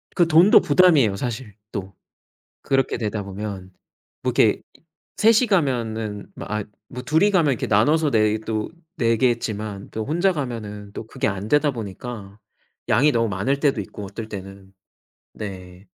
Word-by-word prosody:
그 175 -2 +4
돈도 170 +5 +7
부담이에요. 145 - +4
사실 115 0 -5 0.2
또 95 -2 -5 0.7
그렇게 135 -1 0
되다 105 -2 -3
보면 100 -1 -6 0.5
뭐 - - +1
이렇게 - - +3 0.6
셋이 225 +3 +5
가면은 115 - -1
뭐 - - -7
아 105 0 -2 0.4
둘이 160 +9 +3
가면 165 -7 +3
이렇게 120 - -4
나눠서 145 +9 +3
내 110 -2 +3
또 110 -1 -2 0.3
내겠지만 115 -4 0
그 110 - -4
혼자 170 - +1
가면은 110 - -5
또 110 - -7
그게 130 +4 -2
안 100 0 -3
되다 150 +1 +3
보니까 110 -2 -7 0.5
양이 145 +6 +4
너무 115 -3 +1
많을 105 +9 -1
때도 140 -7 +1
있고 100 +1 -8
어떨 110 +3 -7
때는. 95 -1 -9 0.6
네. 95 -2 -8
110 Hz, 280 characters per minute, -22 LUFS, 105-140 Hz, 0.7 s, 돈도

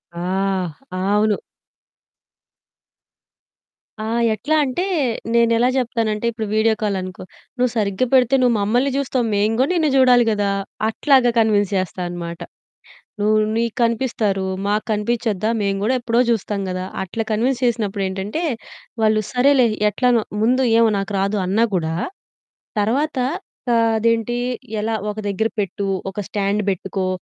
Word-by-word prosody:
ఆ! - - -5 0.8
అవును. 205 +3 +2 2.7
ఆ! - - -3 0.3
ఎట్లా 290 +8 -1
అంటే, 275 +6 -1 0.5
నేనెలా 235 +1 +3
జెప్తానంటే 230 -4 -1
ఇప్పుడు 220 -1 -4
వీడియో 220 +1 +3
కాల్ 205 -2 0
అనుకో, 185 0 -7 0.3
నువు 250 0 +2
సరిగ్గా 205 +1 0
పెడితే 260 0 +5
నువు 245 -2 +4
మమ్మల్ని 245 +7 +1
జూస్తావు. 260 -3 0
మేము 210 +2 +1
గూడా 265 - +3
నిన్ను 320 -3 +2
జూడాలి 250 -2 +5
గదా! 205 -1 0 0.4
అట్లాగా 260 +1 +3
కన్విన్స్ 210 -3 +3
చేస్తా 185 0 -3
అనమాట. 170 -1 -6 0.8
నువు 215 +1 +3 0.2
నీకు 230 -1 0
కనిపిస్తారు. 225 -4 0 0.2
మాకు 210 +1 0
కనిపించొద్దా? 215 -1 -1
మేము 195 -1 0
గూడా 235 +5 +2
ఎప్పుడో 240 0 +1
జూస్తాం 205 -3 -1
గదా! 185 0 -3 0.2
అట్లా 205 +4 -3
కన్విన్స్ 245 +4 0
చేసినప్పుడేంటంటే, 205 - -1 0.6
వాళ్ళు 215 0 +3
సరేలే 260 0 +4 0.2
ఎట్లనో. 240 +1 +2 0.2
ముందు 255 +3 +3 0.2
ఏమో 230 -1 +5
నాకు 195 +1 -3
రాదు 200 +2 0
అన్నా 210 +5 +2
గూడా 160 -1 -1 0.9
తర్వాత 275 +8 0 0.6
ఆహ్, 230 0 +4
అదేంటి 230 +1 +1 0.5
ఎలా? 225 +1 -1 0.2
ఒక 210 - -11
దగ్గర 210 +3 0
పెట్టు. 200 0 -2 0.2
ఒక 200 - -7
స్టాండ్ 205 0 0
బెట్టుకో. 190 0 -3
220 Hz, 130 wpm, -20 LUFS, 200-240 Hz, 2.7 s, పెడితే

